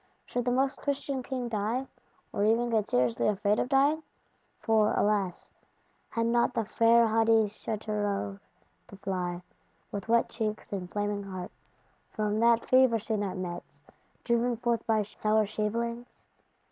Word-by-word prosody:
Should 245 -1 -3
the 245 - +1
Most 265 +2 +1
Christian 275 -1 -2
King 255 -1 -4
die; 225 +4 -1 0.5
or 200 - 0
even 230 +3 +2
get 215 -2 +1
seriously 120 -2 +1
afraid 205 +1 +1
of - - -1
dying! 285 +3 +3 0.6
For, 220 -2 +3
alas, 200 -4 0 0.6
had 230 0 -1
not 235 +1 +2
the 225 - 0
fair 230 +2 +4
haughty 225 0 +4
Châteauroux 205 -1 -3 0.5
to - - -12
fly, 180 -2 -3 0.5
with 205 +2 -6
wet 235 0 +4
cheeks 215 -2 -4
and 180 -3 -4
flaming 205 0 -1
heart, 185 -2 -7 0.6
from 210 0 -1
that 235 0 +4
Fever 255 -3 +5
scene 215 -1 -2
at 195 -2 -3
Metz; 175 -6 -7 0.4
driven 235 0 +1
forth 235 0 0
by 220 -2 +2
sour 215 +1 +1
shavelings? 235 +3 -2
220 Hz, 145 wpm, -29 LUFS, 200-235 Hz, 0.6 s, Fever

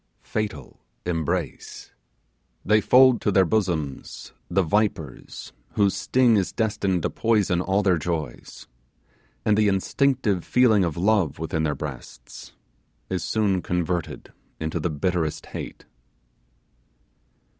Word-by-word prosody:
Fatal 105 -2 -4 0.3
embrace! 80 -4 -3 0.7
They 105 +1 +4
fold 130 0 +5
to 105 - +1
their 95 -1 +4
bosom 85 -8 -1 0.5
the 95 +2 +2
vipers 85 -6 -2 0.2
whose 100 -2 +2
sting 115 +4 +3
is 95 - 0
destined 100 -6 -1
to - - -1
poison 105 -6 +1
all 95 +3 +1
their 90 -4 +3
joys; 80 -6 -5 0.8
and 105 - +4
the 105 0 +3
instinctive 100 0 +1
feeling 115 -6 +4
of 85 -3 -2
love 90 -6 +2
within 80 0 -2
their 75 -2 0
breast 65 -4 -9 0.6
is 95 - -1
soon 100 -4 +1
converted 90 -1 -3 0.3
into 80 +2 -2
the 85 - -1
bitterest 80 +1 -2
hate. - - -8
95 Hz, 115 wpm, -24 LUFS, 80-105 Hz, 0.8 s, fold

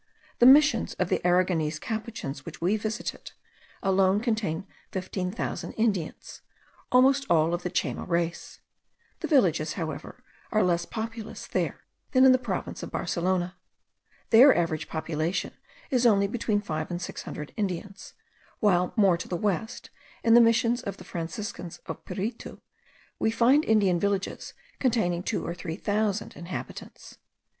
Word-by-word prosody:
The 240 - +7
Missions 280 -3 +5
of 185 - -1
the 185 - +1
Aragonese 175 -3 +2
Capuchins 220 - -5
which - - -9
we 180 +5 +2
visited, 215 +1 -4 0.5
alone 190 +1 +3
contain 215 -8 -1 0.3
fifteen 185 -1 -3
thousand 220 - -4
Indians, 205 -8 -2 0.5
almost 270 +2 +4
all 165 0 +3
of 175 - -1
the 180 - -3
Chayma - - -2
race. 170 0 -2 0.6
The - - -3
villages, 165 - +3
however, 160 -4 -6 0.3
are 215 -1 +3
less 175 -1 +1
populous 225 -1 -6
there - - -2 0.3
than 260 0 +6
in 260 - +8
the 255 - +4
province - - -4
of - - -6
Barcelona. 180 0 -1 0.7
Their 255 +5 +8
average 165 -3 -1
population 160 +2 -2 0.4
is 250 -2 +4
only 200 -3 +4
between 210 0 -1
five 155 -5 -4
or 175 - -3
six 175 - -6
hundred 150 -1 -7
Indians; 195 -1 -4 0.4
while 180 -4 +2
more 195 -6 +4
to - - -7
the 175 - -2
west, 210 +4 -2 0.3
in 230 - +5
the 240 - +9
Missions 230 +1 +3
of 200 - -5
the - - -11
Franciscans 170 +1 -6
of - - -7
Piritu, 200 +6 -5 0.6
we - - +2
find 245 +6 +4
Indian 200 -5 +3
villages 200 0 -2 0.2
containing 220 -9 +1
two - - -2
or 170 - -3
three 165 -2 -5
thousand 210 +1 -1
inhabitants. 170 +1 -8
195 Hz, 145 wpm, -27 LUFS, 175-225 Hz, 0.7 s, the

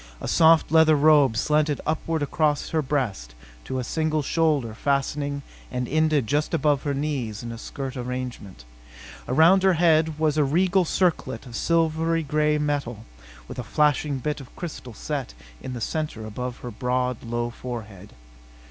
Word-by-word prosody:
A - - -5
soft 160 -1 +4
leather 160 -1 +6
robe 145 -5 +4
slanted 150 +2 +1
upward 160 0 -1
across 150 0 0
her 160 - +1
breast 115 - -2 0.3
to 130 - -3
a 130 - -2
single 155 +3 -1
shoulder 145 -7 +1
fastening 140 +3 -1 0.3
and 125 -1 -2
ended 155 -2 +2
just 150 +7 0
above 150 -4 +2
her 145 -1 -2
knees 135 -7 -3
in 120 - -5
a 115 - -7
skirt 135 +2 -6
arrangement. 125 - -6 0.6
Around 165 +8 +5
her 190 0 +4
head 160 -2 +3
was 155 -1 +1
a - - +5
regal 180 +6 +2
circlet 165 -9 0
of 120 -3 -9
silvery 165 +1 +1
gray 150 +1 +1
metal 140 -7 -2 0.4
with - - -8
a - - -3
flashing 150 +2 +1
bit 150 +2 -3
of 130 - -14
crystal 135 -9 -7
set 140 - -4 0.3
in 130 - -6
the 120 - -5
center 150 -6 -3
above 125 +3 -5
her 120 - -6
broad, 125 +1 -1
low 120 +1 -3
forehead. 110 -6 -8
145 Hz, 160 wpm, -24 LUFS, 125-155 Hz, 0.6 s, leather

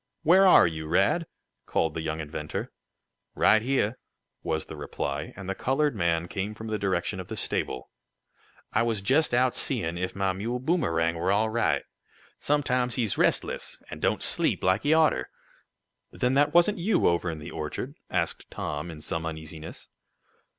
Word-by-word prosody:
"Where 190 +4 +6
are - - +8
you, 80 -2 -3
Rad?" 130 - +2 0.4
called 80 -1 0
the 80 - -3
young 80 0 -3
inventor. 75 0 -5 0.6
"Right 110 - +5
heah," 125 -2 0 0.4
was 80 0 -2
the - - -9
reply, 70 0 -4
and 95 -2 -8
the 95 - -1
colored 135 +5 0
man 85 -3 0
came 100 +3 -4
from 110 0 -7
the 110 -1 -1
direction 95 0 -1
of 90 - -7
the - - -6
stable. 65 -1 -2 0.8
"I 110 - +3
were 115 -1 +1
jest 135 +10 +2
out 125 +1 +3
seein' 85 -10 -1
if 90 0 -3
mah 95 -1 0
mule 115 +6 -3
Boomerang 120 - +1
were 95 - +1
all 110 +2 +2
right. 120 +1 +1 0.6
Sometimes 125 -4 +1
he's 115 -5 0
restless, - - 0
an' - - -6
don't - - +1
sleep - - +1
laik 95 +2 +3
he 145 - +1
oughter." 160 -1 +3 0.8
"Then 125 +1 0
that 145 +2 +3
wasn't 175 +4 +4
you 185 +2 +2
over 85 0 +2
in 80 - -4
the 75 - -8
orchard?" 75 -2 -5 0.2
asked - - -2
Tom, 75 +3 -4
in 80 -2 -9
some 80 +1 -3
uneasiness. 80 0 -7
100 Hz, 170 wpm, -27 LUFS, 80-125 Hz, 0.8 s, are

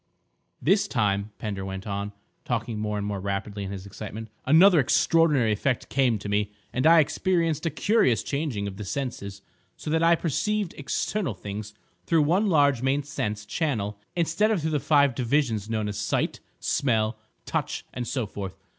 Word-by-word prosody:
"This 195 +6 +3
time," 100 -3 0
Pender 100 -3 -4
went 95 0 -6
on, 100 0 -3 0.3
talking 115 -2 -2
more 105 -1 -2
and 100 - -2
more 100 -1 -3
rapidly 100 +1 -3
in 95 - -5
his 95 -1 -6
excitement, 110 +2 -8 0.2
"another 170 +4 +7
extraordinary 145 -3 +3
effect 125 +4 -1
came 130 -5 +2
to 100 - -7
me, 105 0 0 0.2
and 130 +4 +2
I 165 0 +8
experienced 165 0 0
a - - +2
curious 155 - +2
changing 140 -9 -2
of 95 -1 -7
the 105 - -5
senses, 100 -4 -5 0.3
so 150 - -5
that 160 +1 +2
I 170 0 +5
perceived 200 +5 -1
external 145 - -2
things 105 +1 -7 0.3
through 165 -2 +4
one 185 +8 +2
large 145 -8 +3
main 135 +2 +1
sense 105 -7 -3
channel 105 - -2 0.2
instead 170 +5 +2
of 210 -6 +1
through 160 - 0
the 150 - +1
five 140 -2 +4
divisions 120 -4 0
known 110 -2 -1
as 105 - -4
sight, - - -1 0.2
smell, 115 -5 +1 0.3
touch, - - -2
and 120 -1 -4
so 130 -2 -1
forth. 95 -2 -7
120 Hz, 175 wpm, -26 LUFS, 105-155 Hz, 0.3 s, I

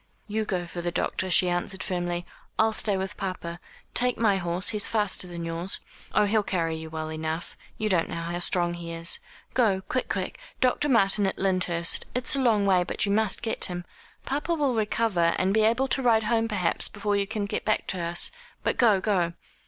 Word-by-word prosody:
"You 215 +1 -1
go 180 -4 -2
for 175 0 -6
the 175 - -1
doctor," 185 +1 -1
she 180 +1 +5
answered 175 +2 -2
firmly. 175 -1 -2 0.3
"I'll 220 0 +3
stay 205 -2 +1
with 190 0 -4
papa. 175 -3 -4 0.3
Take 250 0 +2
my 215 -4 +3
horse, 175 +1 +1
he's 210 -2 +2
faster 210 -4 +2
than 170 -1 -6
yours. 165 +3 -2 0.4
Oh, 210 - +5
he'll 215 +1 +2
carry 170 -5 -1
you 160 0 -7
well 155 0 -4
enough. 160 +1 -4 0.2
You 215 - -1
don't 180 -5 +1
know - - -4
how 170 +1 -3
strong 175 -1 +1
he 170 -1 -6
is 165 +1 0 0.3
go, 210 -7 +2
quick 255 +6 -2
quick - - -3 0.2
Dr. 260 +3 +2
Martin, 205 -4 +3
at - - -2
Lyndhurst 180 -3 0
it's 255 +3 +2
a 275 - +1
long 220 -5 +3
way, 185 -2 +4
but 185 - 0
you 200 - -1
must 215 -1 +1
get 225 - 0
him. 175 -1 -5 0.4
Papa 295 +5 -1
will 285 -5 +1
recover, 210 -6 +1
and 190 +1 +1
be 220 - +4
able 235 +5 +3
to 270 - +1
ride 230 -3 +4
home, 225 +1 +1
perhaps, 190 -6 +2
before 205 0 -1
you 200 0 0
can 215 -1 -2
get 200 - -3
back 215 - +1
to 185 - -2
us, 170 +1 0 0.3
but - - 0
go, 220 -5 +5
go." 185 -4 +1
195 Hz, 205 wpm, -26 LUFS, 175-220 Hz, 0.4 s, she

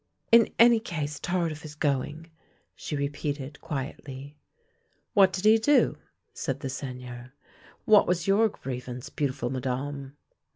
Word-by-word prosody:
" - - -44
In 230 - +1
any 235 0 +7
case, 150 -9 -4
Tardif 170 -4 -2
is 150 -1 -9
going," 150 +3 -2 0.4
she 150 - -5
repeated 140 0 -4
quietly, 140 0 -6 0.4
" - - -44
What 195 -2 +6
did 190 +1 -4
he 220 +1 +7
do? 290 +6 +4 0.2
" - - -52
said - - -3
the 135 - -3
Seigneur. 125 -2 -7 0.2
" - - -26
What 215 -1 +6
was 175 -1 0
your 210 +3 +4
grievance, 125 - -7
beautiful 130 -4 -2
Madame?" 135 +2 -4
145 Hz, 150 wpm, -27 LUFS, 130-180 Hz, 0.4 s, any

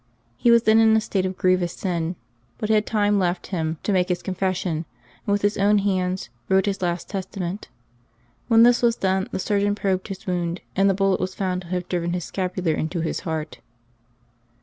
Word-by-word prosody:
He 240 - +2
was 235 -1 +6
then 220 0 +5
in 220 0 +5
a - - +4
state 195 -3 -1
of 185 - -6
grievous 185 -2 +2
sin, 175 -2 -2 0.4
but 215 - -3
had 215 -1 +3
time 205 -2 +2
left 175 -1 -1
him 160 -2 -1
to - - 0
make 185 0 +2
his 180 - -1
confession, 185 -3 -2 0.4
and - - +1
with 205 0 +1
his 205 0 +1
own 205 +1 +4
hands 185 -5 -1 0.2
wrote 190 +1 +3
his 200 -2 -2
last 175 -1 -2
testa 195 0 -6
ment. 185 +3 -4 0.8
When 230 -1 +6
this 245 0 +5
was 235 -1 +3
done, 190 0 0
the - - -2
surgeon 205 +1 +1
probed 190 -2 -1
his 195 -2 -8
wound, 175 -1 -2
and 195 +1 +4
the 195 - +2
bullet 195 -1 +2
was 185 0 -3
found 185 -2 -1
to 180 - -12
have 180 0 -3
driven 175 -1 -1
his 180 -2 -3
scapular 185 -3 -2
into 160 +3 -2
his 160 - -2
heart. 155 -7 -4
185 Hz, 205 wpm, -23 LUFS, 180-205 Hz, 0.8 s, was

